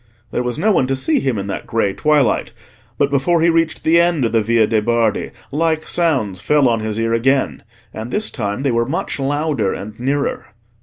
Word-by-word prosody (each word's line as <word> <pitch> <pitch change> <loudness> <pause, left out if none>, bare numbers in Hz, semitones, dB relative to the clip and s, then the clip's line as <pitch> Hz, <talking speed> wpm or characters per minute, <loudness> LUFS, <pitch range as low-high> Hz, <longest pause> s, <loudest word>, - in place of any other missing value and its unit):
There - - -1
was 125 -1 -2
no 210 +7 +2
one 135 -10 +2
to 135 - 0
see 135 +4 +1
him 130 -5 -1
in 100 - -3
that 100 - -5
grey 105 -4 0
twilight. 150 0 +1 0.4
But 140 - +1
before 140 +5 +2
he 170 +1 +4
reached 165 -1 0
the 170 +1 +5
end 170 -6 +1
of 115 - 0
the 115 - +2
Via 115 +1 +3
de' 110 0 +1
Bardi, 115 -1 0 0.2
like 160 +1 0
sounds 130 - 0
fell 145 +3 +3
on 115 -2 +1
his 110 -1 -3
ear 115 0 0
again, 135 +4 +1 0.3
and 110 +2 -6
this 215 - -2
time 105 +1 -3
they 140 - +1
were 115 0 +1
much 150 0 -3
louder 140 -5 -1
and 105 +3 -8
nearer. 140 -3 -2
130 Hz, 210 wpm, -18 LUFS, 115-155 Hz, 0.4 s, the